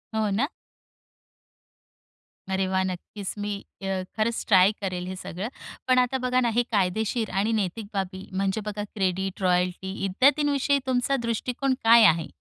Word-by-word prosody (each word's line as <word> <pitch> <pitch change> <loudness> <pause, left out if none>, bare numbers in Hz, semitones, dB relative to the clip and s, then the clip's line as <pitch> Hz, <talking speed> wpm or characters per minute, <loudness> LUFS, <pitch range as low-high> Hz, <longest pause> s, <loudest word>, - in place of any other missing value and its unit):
हो 215 -1 +1
ना? 225 +8 +1 2.0
अरे 190 0 +1
वाह! 190 0 +1
नक्कीच. 190 +2 -5
मी 205 0 -2 0.3
अ, 190 -1 -1
खरंच 225 +1 0
ट्राय 190 -1 +6
करेल, 180 -2 -3
हे 185 - -5
सगळं. 185 +2 -5 0.4
पण 255 - +4
आता 250 +1 +1
बघा 250 0 +2
ना, 240 -2 +2
हे 240 - +4
कायदेशीर 215 +3 0
आणि 200 +4 +1
नैतिक 200 +2 -3
बाबी, 190 -1 -4
म्हणजे 195 +2 0
बघा 210 0 -3
क्रेडिट, 190 -1 -1
रॉयल्टी 180 +1 +1
इत्यादींविषयी 280 +6 +3
तुमचा 255 +2 +1
दृष्टिकोन 250 +4 -1
काय 230 0 +8
आहे? 165 -3 +4
200 Hz, 145 wpm, -26 LUFS, 190-235 Hz, 2.0 s, काय